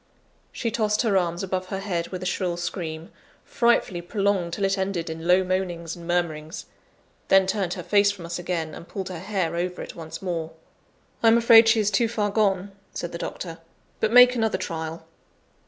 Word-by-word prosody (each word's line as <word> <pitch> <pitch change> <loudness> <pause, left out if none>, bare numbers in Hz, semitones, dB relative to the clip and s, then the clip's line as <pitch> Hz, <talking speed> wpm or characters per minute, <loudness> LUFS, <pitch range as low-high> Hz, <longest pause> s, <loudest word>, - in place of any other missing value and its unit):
She 230 - -3
tossed 215 0 +1
her 215 -4 +1
arms 175 -1 0
above 185 -1 -3
her 195 - -4
head 175 -4 -2
with 185 -1 -6
a - - -4
shrill 180 -1 -1
scream, 165 -2 -5 0.3
frightfully 235 -7 +1
prolonged 195 -2 -1
till 200 +2 0
it 195 0 +1
ended 190 -4 -2
in 160 +1 -6
low 180 +1 +5
moanings 180 -3 -2
and 170 -1 -11
murmurings; 170 -1 -2 0.6
then 195 0 +5
turned 190 -2 -1
her 180 - -6
face 200 +3 +4
from 195 -4 -5
us 170 +1 -4
again, 170 -3 -3
and 170 - -10
pulled 190 -2 -5
her 180 -3 -6
hair 185 -3 -2
over 180 +1 -2
it - - -7
once 160 -2 -8
more. 165 -4 -4 0.7
"I 230 - +4
am 225 +1 +7
afraid 230 -1 +7
she 225 0 +4
is 210 -1 +1
too 230 +4 +2
far 210 -3 -1
gone," 200 -2 +1 0.2
said 175 - -4
the 170 - -6
doctor; 165 -2 -6 0.4
"but 220 - +1
make 250 +1 +8
another 225 -5 0
trial." 165 -3 -5
185 Hz, 195 wpm, -25 LUFS, 170-205 Hz, 0.7 s, make